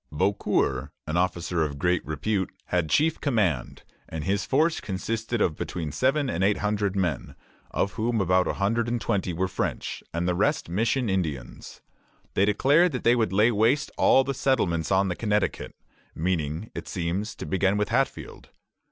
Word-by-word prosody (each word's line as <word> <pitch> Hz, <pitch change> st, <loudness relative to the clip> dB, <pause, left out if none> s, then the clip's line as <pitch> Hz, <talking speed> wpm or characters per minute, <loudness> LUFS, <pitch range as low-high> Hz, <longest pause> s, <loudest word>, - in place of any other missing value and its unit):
Beaucour, 75 Hz, -6 st, 0 dB
an 80 Hz, -, -3 dB
officer 85 Hz, -1 st, 0 dB
of 75 Hz, -3 st, -1 dB
great 90 Hz, +4 st, +1 dB
repute, 95 Hz, +6 st, -1 dB, 0.2 s
had 90 Hz, -3 st, 0 dB
chief 155 Hz, -, +2 dB
command, 105 Hz, -, 0 dB, 0.3 s
and 80 Hz, -1 st, -5 dB
his 100 Hz, +5 st, -1 dB
force 155 Hz, +4 st, +2 dB
consisted 110 Hz, +4 st, -3 dB
of 80 Hz, -, +2 dB
between 80 Hz, -2 st, -4 dB
seven 135 Hz, -, +1 dB
and 90 Hz, -5 st, -1 dB
eight 100 Hz, +1 st, +3 dB
hundred 105 Hz, -1 st, -1 dB
men, 90 Hz, -4 st, -2 dB, 0.3 s
of 100 Hz, -, -1 dB
whom 115 Hz, 0 st, -1 dB
about 90 Hz, -1 st, +2 dB
a -, -, 0 dB
hundred 115 Hz, +4 st, 0 dB
and 120 Hz, 0 st, -1 dB
twenty 95 Hz, -4 st, -1 dB
were 90 Hz, +3 st, -1 dB
French, 95 Hz, -, -3 dB
and 85 Hz, +1 st, -2 dB
the 90 Hz, -, +2 dB
rest 110 Hz, -, +1 dB
mission 115 Hz, +7 st, 0 dB
Indians. 80 Hz, -, -4 dB, 0.5 s
They 95 Hz, -, +3 dB
declared 145 Hz, -, +3 dB
that 125 Hz, -, -3 dB
they 120 Hz, +1 st, +5 dB
would 110 Hz, -6 st, +1 dB
lay 105 Hz, +5 st, +4 dB
waste 115 Hz, +6 st, +2 dB
all 135 Hz, -, +5 dB
the 140 Hz, -, -2 dB
settlements 100 Hz, -, 0 dB
on 95 Hz, +1 st, +3 dB
the 90 Hz, -, -2 dB
Connecticut, 105 Hz, 0 st, -1 dB, 0.4 s
meaning, 80 Hz, +2 st, -2 dB
it -, -, -7 dB
seems, 90 Hz, +4 st, -3 dB
to -, -, -7 dB
begin 95 Hz, +1 st, +1 dB
with 105 Hz, 0 st, 0 dB
Hatfield. -, -, -2 dB
95 Hz, 170 wpm, -26 LUFS, 85-115 Hz, 0.5 s, they